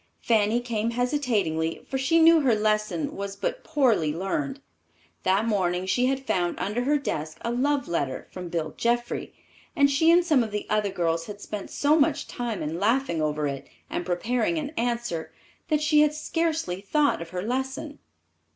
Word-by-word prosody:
Fanny 225 +1 +2
came 230 -2 -1
hesitatingly, 230 - -1
for 265 - -2
she 295 +5 +3
knew 330 0 +7
her 260 -6 +3
lesson 215 +7 0
was 200 0 -5
but - - -3
poorly 240 - +2
learned. 150 -6 -2 0.6
That 195 +4 +2
morning 185 -4 0
she 245 +6 +2
had 270 0 -1
found 180 -6 0
under 225 +5 -2
her 295 +2 +3
desk 155 - -4
a 235 - -2
love 270 +2 0
letter 140 -6 -2
from 180 -1 -7
Bill 165 -2 -3
Jeffrey, 240 +1 -1 0.4
and 280 -3 +4
she 320 +4 +4
and 345 +1 +5
some 305 -7 +4
of 220 - -4
the 210 0 -4
other 210 -1 +2
girls 165 -3 -1
had 205 -1 -8
spent 205 -1 -6
so 300 +2 +2
much 295 +1 +1
time 235 -7 -4
in 160 +3 -3
laughing 220 -5 +1
over 150 0 0
it, 140 -1 -4 0.2
and - - -2
preparing 235 - 0
an 295 -2 -3
answer, 235 - -2 0.4
that 305 -2 +1
she 300 0 +5
had 300 0 +3
scarcely 310 - -1
thought 285 - +1
of 170 - -7
her 180 +1 -4
lesson. 265 +5 -3
230 Hz, 180 wpm, -26 LUFS, 180-285 Hz, 0.6 s, knew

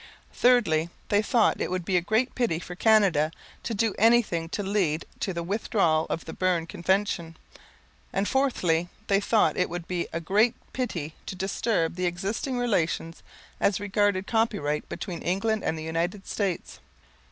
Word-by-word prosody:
Thirdly, 195 -11 +3 0.2
they 205 0 +4
thought 230 0 +2
it - - -1
would 180 -1 -2
be 190 - 0
a 175 - +4
great 220 +8 +1
pity 235 -10 0
for 180 +1 -7
Canada 185 -7 +3 0.3
to 230 - -3
do 220 0 +1
anything 215 -7 +3
to 205 - -3
lead 190 -6 0
to 195 - -1
the 170 -1 -3
withdrawal 180 -4 +1
of 165 - -3
the 160 - -7
Berne 180 -3 +1
Convention; 170 -1 -1 0.7
and 195 +1 0
fourthly, 180 -11 +1 0.2
they 195 -1 +3
thought 215 +1 +2
it 180 - +1
would 175 0 -5
be 180 -2 -2
a 165 - -2
great 210 +8 +2 0.2
pity 175 - -3
to - - -4
disturb 190 -1 0
the 180 0 +1
existing 200 +9 -2
relations 170 -8 -1 0.4
as 200 -1 +2
regarded 205 -1 +1
copyright 205 -11 0
between 175 -4 -5
England 205 +4 0
and 160 - -1
the 155 - -6
United 170 +5 -2
States. 195 -5 -3
190 Hz, 165 wpm, -27 LUFS, 165-215 Hz, 0.7 s, they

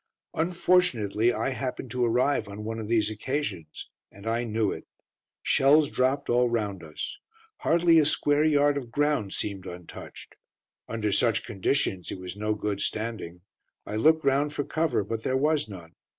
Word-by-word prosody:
Unfortunately 160 - +2
I 135 - -1
happened 130 -1 -4
to 125 0 0
arrive 120 0 +2
on 100 +1 -7
one 115 +1 -4
of 110 - -5
these 110 -2 +2
occasions, 110 - -4 0.2
and 100 +1 -14
I 115 +2 0
knew 110 -2 0
it. - - -7 0.6
Shells 145 +2 +4
dropped 130 +3 +1
all 120 0 +3
round 105 -6 -2
us. 75 -1 -6 0.4
Hardly 170 0 +4
a 155 - +4
square 145 0 +2
yard 145 -2 +3
of 125 -4 -10
ground 145 -8 0
seemed 95 -2 -4
untouched. 90 -1 -10 0.5
Under 110 -2 -2
such 115 +1 +2
conditions 95 -3 -1
it - - -5
was 90 0 -7
no 105 +1 -1
good 105 -1 -3
standing. 105 -6 -3 0.4
I 105 - -5
looked 155 +7 +3
round 140 +2 +2
for 145 - -1
cover, 155 -8 0
but 110 +3 -4
there 130 +3 0
was 150 -2 +1
none. 85 -5 -10
115 Hz, 165 wpm, -27 LUFS, 105-145 Hz, 0.6 s, Shells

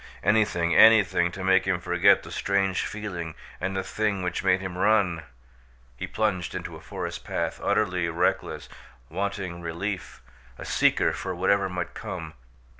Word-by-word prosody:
Anything, 90 -6 +2
anything, 105 -6 +6
to 95 - -6
make 95 0 +4
him 95 -2 +1
forget 90 - +4
the - - -10
strange 95 -1 0
feeling 90 -7 -5 0.2
and 95 +1 -2
the 95 - -1
thing 100 -1 -1
which 90 -1 -2
made 95 -1 +3
him 95 -2 -6
run! 95 -4 +2 0.7
He - - -5
plunged 95 -6 -1
into - - -5
a - - -11
forest - - -6
path, - - -3
utterly 90 -2 +1
reckless, 85 +1 -1 0.4
wanting 95 -1 -3
relief, 85 0 -5 0.3
a - - -8
seeker - - +2
for 90 - -4
whatever 95 +2 +2
might 90 -1 -4
come. 80 -3 -6
95 Hz, 150 wpm, -26 LUFS, 85-100 Hz, 0.7 s, anything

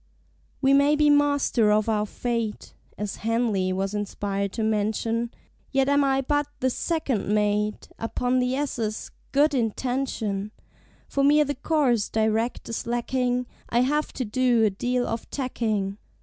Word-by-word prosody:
We 270 0 +4
may 280 +2 +5
be 300 0 +4
Master 285 -6 +3
of 215 +1 +2
our 210 -1 +1
Fate, 230 -2 -3 0.2
(As 210 -1 -4
Henley 220 -5 0
was 190 +2 -2
inspired 200 -1 -2
to 225 - -2
mention) 220 +2 0 0.4
Yet 270 -1 +2
am 285 0 +4
I 270 -1 +2
but 290 +2 0
the 260 0 +1
Second 295 - -1
Mate 210 0 0
Upon 245 +2 0
the 250 +1 +1
ss. 230 -6 -3 0.2
"Good 290 +2 +3
Intention"; 225 -4 -2 0.5
For 275 - 0
me 295 +2 +5
the 285 0 -2
course 270 -6 +1
direct 220 +2 0
is 230 - -4
lacking 245 +1 0 0.2
I 240 - +3
have 295 +4 0
to 255 - -3
do 240 +1 +2
a 210 - +2
deal 245 +5 -1
of 225 0 -4
tacking. 215 -7 -2
235 Hz, 150 wpm, -25 LUFS, 210-270 Hz, 0.5 s, may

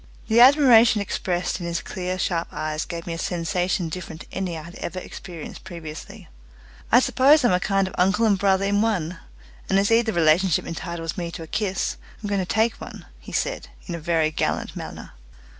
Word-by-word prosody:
The 225 +1 +4
admiration 245 -4 +7
expressed 180 -2 -2
in 175 - -5
his 170 -1 -1
clear 185 +2 -4
sharp 170 -2 -1
eyes 155 0 -3
gave 170 -1 -6
me 170 - -4
a 165 - -5
sensation 180 0 -1
different 160 0 -7
to - - -12
any 180 -3 -3
I 155 - -7
had 170 +2 -11
ever 185 - -5
experienced 175 -3 -8
previously. 160 -4 -9 0.6
"I 240 - +8
suppose 275 +3 +4
I'm 240 - +4
a 180 - +3
kind 195 0 +1
of 190 - -8
uncle 200 +5 +3
and 210 -2 +4
brother 195 0 +2
in 205 +1 +2
one, 185 -6 -1 0.5
and 195 - +3
as 200 +2 +2
either 225 0 +3
relationship 170 0 +3
entitles 165 -1 -5
me 170 -1 -3
to 170 - -7
a - - -8
kiss, 195 0 -2 0.3
I'm 205 - -3
going 200 -1 +1
to - - -2
take 220 +1 +1
one," - - -9
he - - -12
said - - -2 0.2
in 175 - -5
a 170 - -4
very 160 -1 +1
gallant - - -2
manner. - - -8
185 Hz, 200 wpm, -23 LUFS, 170-205 Hz, 0.6 s, I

